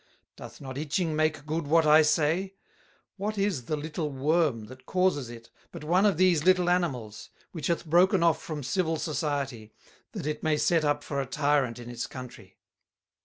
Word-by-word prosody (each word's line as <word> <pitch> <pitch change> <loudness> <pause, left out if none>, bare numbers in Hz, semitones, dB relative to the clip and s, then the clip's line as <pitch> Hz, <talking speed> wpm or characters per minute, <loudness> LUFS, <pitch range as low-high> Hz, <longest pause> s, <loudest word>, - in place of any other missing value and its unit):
Doth - - -11
not 135 -1 -7
Itching 155 +2 -1
make 155 -2 0
good 155 0 -3
what 165 +2 +4
I 155 +1 +7
say? 165 +5 +1 0.6
What 210 +2 -3
is 195 - -1
the 155 - -1
little 155 +1 -4
Worm 140 -4 0
that 130 +3 -14
causes 180 -9 +1
it 115 -1 -12 0.2
but 170 -3 -9
one 180 +6 +3
of 195 - +1
these 180 -4 +3
little 180 0 +4
Animals, 130 -12 -2 0.2
which 160 -5 -4
hath 170 0 -1
broken 175 +3 +4
off 165 -1 +2
from 150 -3 -6
civil 165 +3 0
Society, 140 -8 -3 0.4
that - - -5
it 150 0 -3
may 155 -1 +1
set 165 +1 +2
up 145 -1 0
for 140 -1 -2
a 135 - -5
Tyrant 140 -3 +1
in 120 -1 -10
its 120 0 -5
Country? 125 -2 -11
155 Hz, 180 wpm, -27 LUFS, 135-170 Hz, 0.6 s, I